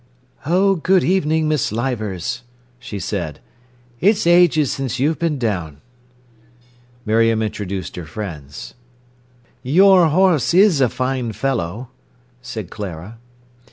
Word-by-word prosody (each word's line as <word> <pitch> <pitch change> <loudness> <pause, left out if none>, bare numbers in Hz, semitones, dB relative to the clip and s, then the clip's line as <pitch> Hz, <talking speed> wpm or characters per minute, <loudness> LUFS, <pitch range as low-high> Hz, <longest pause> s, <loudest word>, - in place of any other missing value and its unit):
"Oh, 190 +3 +3
good 185 +2 +2
evening, 160 -4 +1
Miss 150 -8 0
Leivers," 110 -6 -3 0.4
she 120 -4 -7
said. 90 -6 -4 0.6
"It's 205 +1 +2
ages 170 -5 +4
since 130 -3 -3
you've 150 +5 0
been 165 -3 0
down." 90 - -3 1.3
Miriam 115 0 +2
introduced 100 -3 -5
her 85 -3 -7
friends. 80 -6 -8 0.9
"Your 180 +5 +5
horse 170 -2 +2
is 185 -6 +5
a 125 - +4
fine 130 -2 -2
fellow!" 115 -1 -3 0.5
said 115 -7 -7
Clara. 100 +2 -8
125 Hz, 110 wpm, -19 LUFS, 105-160 Hz, 1.3 s, Your